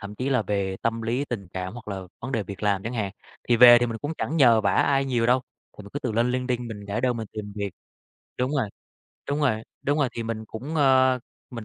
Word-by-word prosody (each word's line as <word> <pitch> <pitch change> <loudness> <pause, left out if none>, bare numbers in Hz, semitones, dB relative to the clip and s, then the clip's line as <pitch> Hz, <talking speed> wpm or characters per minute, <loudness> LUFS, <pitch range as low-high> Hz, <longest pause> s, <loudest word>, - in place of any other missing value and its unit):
Thậm 100 0 -8
chí 125 +5 -3
là 125 -4 +2
về 100 -2 -1
tâm 115 0 -1
lý 120 +5 -1
tình 105 -8 -5
cảm 95 +1 -4
hoặc 120 -2 -10
là 100 -2 -4 0.2
vấn 135 +2 -5
đề 110 - 0
việc 100 +1 -9
làm 100 -2 +1
chẳng 115 - -4
hạn, 100 -4 -1 0.4
thì 120 - +5
về 120 0 +10
thì 120 - +1
mình 115 -1 -4
cũng 145 +2 -3
chẳng 160 - -2
nhờ 120 -6 +6
vả 100 - +1
ai 140 -1 +3
nhiều 120 -4 +1
đâu, 125 +2 +4 0.4
thì 105 - -8
mình 100 - -12
cứ 145 - -2
tự 120 -5 -3
lên 120 +3 +2
LinkedIn 125 -1 -1
mình 105 -2 -8
để 100 +4 -2
đơn 125 -1 +1
mình 110 -1 -4
tìm 105 -1 -6
việc. 100 -1 -2 0.7
Đúng 125 +2 0
rồi, 130 -8 0 0.6
đúng 145 +2 0
rồi, 110 -7 +1 0.2
đúng 145 +2 +1
rồi, 140 -3 +2
thì 115 - -2
mình 110 -1 -4
cũng, 130 +9 -7
ờ, 130 -3 +4 0.3
mình 115 -3 -7
115 Hz, 260 wpm, -25 LUFS, 105-130 Hz, 0.7 s, về